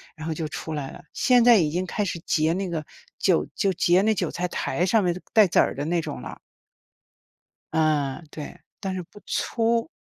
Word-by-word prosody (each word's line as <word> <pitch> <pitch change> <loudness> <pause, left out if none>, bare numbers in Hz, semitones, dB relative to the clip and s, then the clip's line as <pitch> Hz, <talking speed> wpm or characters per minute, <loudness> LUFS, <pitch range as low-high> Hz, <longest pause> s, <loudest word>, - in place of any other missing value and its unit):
然 155 +1 -7
后 160 - -1
就 155 0 -3
出 160 +1 -6
来 140 -3 -4
了， - - -11
现 245 -2 +4
在 240 -2 +7
已 160 -6 +2
经 180 +3 -1
开 210 - -1
始 170 - -3
结 155 +1 +2
那 190 +1 -2
个 160 -3 -3 0.4
韭 75 - +2
就 195 - +1
结 175 +1 +3
那 220 - +3
韭 205 - -1
菜 180 +1 -2
苔 180 0 -2
上 205 +2 +3
面 175 0 0
带 215 -2 +7
籽 - - +2
儿 - - +3
的 140 +2 -3
那 170 +2 +1
种 - - -6
了。 - - -8 1.3
呃， 155 -2 +1
对， 155 +3 -8 0.2
但 190 -1 -3
是 185 - -3
不 205 +5 -16
粗。 230 +3 0
175 Hz, 220 characters per minute, -25 LUFS, 155-195 Hz, 1.3 s, 在